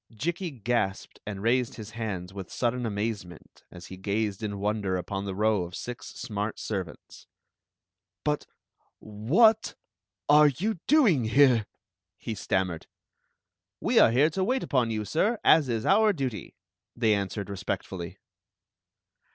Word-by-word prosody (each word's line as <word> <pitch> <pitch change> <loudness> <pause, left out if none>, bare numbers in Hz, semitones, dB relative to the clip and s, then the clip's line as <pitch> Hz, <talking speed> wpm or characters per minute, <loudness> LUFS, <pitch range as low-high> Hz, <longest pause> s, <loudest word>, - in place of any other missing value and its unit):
Jikki 170 - -3
gasped 120 -7 -2
and 100 -2 -5
raised 125 +1 +1
his 110 -1 -9
hands 100 -5 -5
with 95 -3 -8
sudden 125 0 -1
amazement 100 -4 -5
as 90 0 -11
he 95 - -9
gazed 100 +1 -2
in 105 -2 -3
wonder 100 -2 -1
upon 95 +2 -4
the 95 -1 -4
row 105 -1 +2
of 90 +1 -6
six 125 0 -7
smart 105 -3 -4
servants. 95 -5 -6 1.0
"But 150 -1 -1 0.3
— - - -42
what— 165 - +2 0.5
are 150 +1 +7
you 180 - -1
doing 220 - +4
here?" 120 -2 +4 0.5
he 115 - -5
stam 95 -2 0
mered 85 -2 -7 0.9
"We - - +3
are - - +7
here 140 +7 +3
to 190 +4 -1
wait 255 +6 0
upon 125 -4 +1
you, 110 -1 -2
sir, 210 - +1
as 155 -4 +5
is 115 -2 -1
our 210 +2 +4
duty," 130 - -4 0.4
they 115 -3 +3
answered 100 0 -2
respectfully. 95 -3 -5
110 Hz, 145 wpm, -27 LUFS, 100-140 Hz, 1.0 s, are